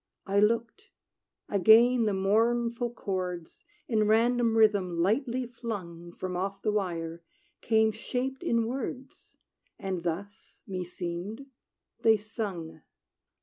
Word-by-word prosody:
I 200 Hz, 0 st, +2 dB
looked; 230 Hz, -, 0 dB, 0.6 s
again 225 Hz, +5 st, +5 dB
the 210 Hz, -, +1 dB
mournful, 235 Hz, +4 st, +1 dB
chords, 185 Hz, -6 st, -5 dB, 0.2 s
In 215 Hz, -3 st, +2 dB
random 230 Hz, +1 st, +3 dB
rhythm 200 Hz, -5 st, +3 dB
lightly 240 Hz, -, +1 dB
flung 195 Hz, -8 st, -7 dB
From 180 Hz, +1 st, -5 dB
off 195 Hz, +2 st, -3 dB
the 215 Hz, -, +2 dB
wire, 170 Hz, -5 st, -2 dB, 0.4 s
came 220 Hz, -1 st, +3 dB
shaped 250 Hz, +4 st, -3 dB
in 230 Hz, -1 st, +1 dB
words; 255 Hz, +2 st, -6 dB, 0.4 s
And 190 Hz, -2 st, -3 dB
thus, 190 Hz, +4 st, -6 dB
meseemed, 180 Hz, +5 st, -5 dB, 0.6 s
they 220 Hz, -1 st, +5 dB
sung. 190 Hz, -7 st, -6 dB
210 Hz, 105 wpm, -29 LUFS, 185-235 Hz, 0.6 s, again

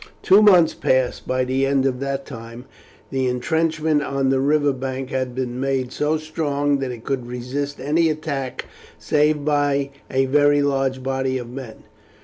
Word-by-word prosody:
Two 195 Hz, +3 st, +6 dB
months 180 Hz, -6 st, +6 dB
passed. 130 Hz, -1 st, 0 dB
By 130 Hz, 0 st, +1 dB
the 130 Hz, +1 st, 0 dB
end 135 Hz, -1 st, +2 dB
of 130 Hz, -2 st, 0 dB
that 140 Hz, 0 st, -3 dB
time 115 Hz, +2 st, -9 dB, 0.5 s
the 130 Hz, -1 st, 0 dB
intrenchment 155 Hz, +4 st, 0 dB
on 135 Hz, -2 st, -1 dB
the 135 Hz, 0 st, +2 dB
river 145 Hz, +1 st, +2 dB
bank 130 Hz, 0 st, -5 dB
had 130 Hz, -2 st, -2 dB
been 125 Hz, -1 st, -3 dB
made 135 Hz, -2 st, -1 dB
so 150 Hz, +3 st, 0 dB
strong 145 Hz, -2 st, -1 dB
that 135 Hz, -1 st, -2 dB
it 120 Hz, -2 st, -7 dB
could 130 Hz, -3 st, -3 dB
resist 130 Hz, +4 st, -4 dB
any 155 Hz, +5 st, +2 dB
attack 145 Hz, -4 st, -4 dB, 0.3 s
save 150 Hz, -1 st, +1 dB
by 145 Hz, -2 st, +1 dB, 0.2 s
a 135 Hz, 0 st, +1 dB
very 145 Hz, +1 st, +3 dB
large 135 Hz, -2 st, 0 dB
body 130 Hz, 0 st, -1 dB
of 120 Hz, -1 st, -7 dB
men. 125 Hz, -3 st, -9 dB
135 Hz, 165 wpm, -21 LUFS, 130-145 Hz, 0.5 s, Two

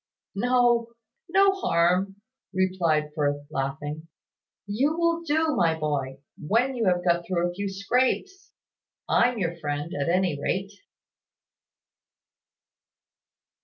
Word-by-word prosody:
"No 240 Hz, +1 st, +2 dB, 0.4 s
no 390 Hz, +2 st, +5 dB
harm," 185 Hz, -, +1 dB, 0.4 s
replied 170 Hz, -5 st, +1 dB
Firth, 145 Hz, -1 st, -1 dB
laughing. 145 Hz, +3 st, -4 dB, 0.6 s
"You 265 Hz, +10 st, 0 dB
will 335 Hz, 0 st, +1 dB
do, 320 Hz, 0 st, +1 dB
my 165 Hz, -2 st, +2 dB
boy 140 Hz, -3 st, -3 dB, 0.2 s
when 230 Hz, -, +1 dB
you 235 Hz, -3 st, -1 dB
have 180 Hz, -1 st, +1 dB
got 170 Hz, -1 st, +2 dB
through 175 Hz, -1 st, 0 dB
a 175 Hz, -, -5 dB
few 200 Hz, +2 st, -3 dB
scrapes. 255 Hz, -, -1 dB, 0.6 s
I'm 245 Hz, 0 st, +3 dB
your 170 Hz, -4 st, -2 dB
friend, 145 Hz, +1 st, -3 dB
at 140 Hz, +2 st, -1 dB
any 175 Hz, -5 st, +1 dB
rate." 195 Hz, +6 st, -2 dB
185 Hz, 110 wpm, -26 LUFS, 155-245 Hz, 0.6 s, no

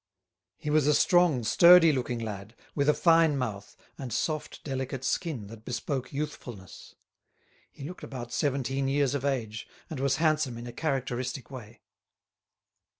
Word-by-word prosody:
He 150 Hz, -, -4 dB
was 150 Hz, -2 st, +3 dB
a 150 Hz, -, +4 dB
strong, 175 Hz, -9 st, +3 dB
sturdy 170 Hz, +7 st, +7 dB
looking 125 Hz, -2 st, -2 dB
lad, 105 Hz, -1 st, -6 dB, 0.2 s
with 140 Hz, 0 st, +1 dB
a -, -, +6 dB
fine 165 Hz, -3 st, +4 dB
mouth, 110 Hz, -6 st, -5 dB, 0.2 s
and 130 Hz, -3 st, -6 dB
soft 155 Hz, +6 st, -3 dB
delicate 135 Hz, -1 st, -4 dB
skin 135 Hz, -, -2 dB
that 110 Hz, +1 st, -12 dB
bespoke 125 Hz, +3 st, -4 dB
youthfulness. 130 Hz, -9 st, -7 dB, 0.8 s
He -, -, -12 dB
looked 175 Hz, +6 st, -8 dB
about 120 Hz, -3 st, -7 dB
seventeen 135 Hz, -1 st, -1 dB
years 140 Hz, -1 st, +1 dB
of 140 Hz, -2 st, -2 dB
age, 115 Hz, -6 st, -2 dB, 0.2 s
and 155 Hz, -, -4 dB
was 135 Hz, 0 st, +1 dB
handsome 155 Hz, -5 st, +1 dB
in 120 Hz, -, -8 dB
a 120 Hz, -, -8 dB
characteristic 135 Hz, -2 st, -3 dB
way. 120 Hz, -5 st, -10 dB
135 Hz, 150 wpm, -28 LUFS, 120-150 Hz, 0.8 s, sturdy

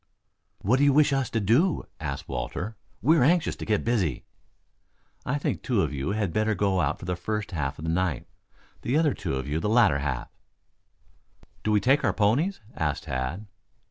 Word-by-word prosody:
"What 115 Hz, +7 st, +3 dB
do -, -, +4 dB
you 140 Hz, -1 st, +5 dB
wish 145 Hz, -1 st, +4 dB
us 135 Hz, -2 st, 0 dB
to 115 Hz, -, 0 dB
do?" 125 Hz, -, +2 dB, 0.2 s
asked -, -, -5 dB
Walter. 110 Hz, +5 st, -4 dB, 0.3 s
"We 160 Hz, +6 st, +5 dB
are -, -, +4 dB
anxious 170 Hz, +4 st, +2 dB
to -, -, -7 dB
get 105 Hz, -2 st, +1 dB
busy." 100 Hz, -, 0 dB, 1.0 s
"I 140 Hz, -, +1 dB
think 145 Hz, -, -2 dB
two 120 Hz, -7 st, +1 dB
of -, -, -2 dB
you 70 Hz, +8 st, -2 dB
had 105 Hz, -6 st, -1 dB
better 110 Hz, +1 st, +1 dB
go 95 Hz, -3 st, +1 dB
out 75 Hz, -1 st, 0 dB
for -, -, -10 dB
the 90 Hz, 0 st, -1 dB
first 105 Hz, +4 st, -3 dB
half 70 Hz, -5 st, -2 dB
of 75 Hz, -, -7 dB
the 80 Hz, -, 0 dB
night; 85 Hz, -6 st, -1 dB, 0.6 s
the 125 Hz, -, 0 dB
other 155 Hz, -4 st, +3 dB
two 65 Hz, -, -3 dB
for 75 Hz, +4 st, -2 dB
the 105 Hz, -, -1 dB
latter 110 Hz, -, +4 dB
half." 70 Hz, -4 st, -3 dB, 1.3 s
"Do -, -, -1 dB
we 105 Hz, -1 st, +4 dB
take 135 Hz, +8 st, +3 dB
our 110 Hz, -6 st, +2 dB
ponies?" 125 Hz, -, +1 dB
asked 75 Hz, -2 st, -1 dB
Tad. 65 Hz, +11 st, -3 dB
105 Hz, 195 wpm, -26 LUFS, 80-125 Hz, 1.3 s, you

